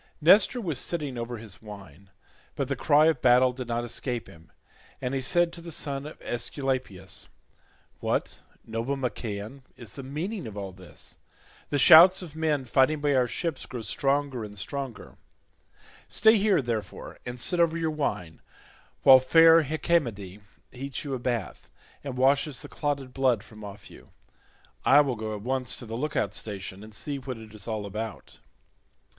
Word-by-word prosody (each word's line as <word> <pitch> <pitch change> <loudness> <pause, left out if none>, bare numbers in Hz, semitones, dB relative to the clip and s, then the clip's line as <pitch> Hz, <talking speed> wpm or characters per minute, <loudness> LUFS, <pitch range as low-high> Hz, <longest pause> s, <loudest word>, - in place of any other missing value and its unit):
Nestor 195 - +5
was 165 - -3
sitting 150 -6 -3
over 120 0 -4
his 110 -3 -11
wine, 100 -4 -12 0.5
but 140 -3 -2
the 135 - -1
cry 150 +3 +4
of 160 -5 +2
battle 125 +1 +5
did 125 -1 -6
not 120 0 -1
escape 120 0 -2
him, 80 0 -17 0.5
and 125 0 -3
he 135 - -1
said 175 +5 +2
to 170 - -9
the 170 0 -9
son 140 -2 -4
of 155 - -11
Aesculapius, 120 -6 -3 0.7
"What, - - -2 0.3
noble 115 +5 -2
Machaon, 120 -1 -5 0.2
is 120 -3 -10
the 140 - -8
meaning 160 - -4
of 105 -2 -9
all 100 -2 -5
this? 90 -1 -10 0.5
The 145 - 0
shouts 175 +7 +8
of 160 -4 -10
men 155 -4 0
fighting 135 +5 +3
by 145 -1 +1
our 125 -2 +3
ships 160 +3 -3
grow 125 -3 -6
stronger 135 +3 -1
and 105 -1 -9
stronger; 135 +2 -6 0.9
stay 220 +2 +5
here, 200 -7 +3
therefore, 115 -3 -5
and 125 0 -7
sit 175 +8 +1
over 165 -1 +3
your 160 -1 -1
wine, 90 - -3 0.6
while 130 -1 +9
fair 165 +5 +7
Hecamede 120 - -1 0.3
heats 135 +2 -5
you 140 -2 -4
a 130 - -2
bath 120 - -3 0.3
and 135 -3 -5
washes 140 +2 +2
the - - -9
clotted 140 -4 -3
blood 125 -5 +2
from 110 -1 -13
off 100 -1 -10
you. - - -15 0.7
I 145 +2 +7
will 135 -4 -1
go 110 -1 -4
at 105 - -8
once 130 -2 -2
to - - -8
the 110 - -8
look 140 +6 -3
out 100 - 0
station 100 -2 -6
and 110 - -12
see 140 +3 -3
what 130 -2 -6
it 110 -1 -12
is 105 -1 -3
all 110 -2 -3
about." 105 +2 -7
130 Hz, 175 wpm, -27 LUFS, 110-145 Hz, 0.9 s, while